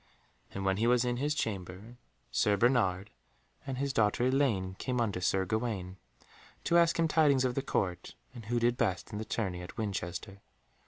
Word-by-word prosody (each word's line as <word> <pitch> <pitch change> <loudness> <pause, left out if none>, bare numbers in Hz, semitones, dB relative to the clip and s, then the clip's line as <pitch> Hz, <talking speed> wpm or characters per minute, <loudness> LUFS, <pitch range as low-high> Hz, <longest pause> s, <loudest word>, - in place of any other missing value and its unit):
And 100 0 -5
when 95 0 +2
he 115 +3 +1
was 125 0 +3
in 120 0 -1
his 145 +3 0
chamber, 100 - -4 0.4
Sir 105 -1 +2
Bernard 100 -5 +2 0.6
and 130 -2 -3
his 140 0 -1
daughter 105 +1 +2
Elaine 125 -9 +1
came 125 -1 -2
unto 105 -6 0
Sir 95 +1 +1
Gawaine, 100 -3 -3 0.7
to 170 - +4
ask 170 0 +3
him 165 -1 +3
tidings 145 -5 +3
of 125 - 0
the 135 - -1
Court, 90 -10 -2 0.2
and 120 -4 -10
who 120 +2 0
did 120 +1 +2
best 95 -5 -1
in 105 - -4
the 110 - -4
tourney 95 -7 -2
at 90 - -10
Winchester. 100 -1 -4
110 Hz, 180 wpm, -31 LUFS, 95-125 Hz, 0.7 s, to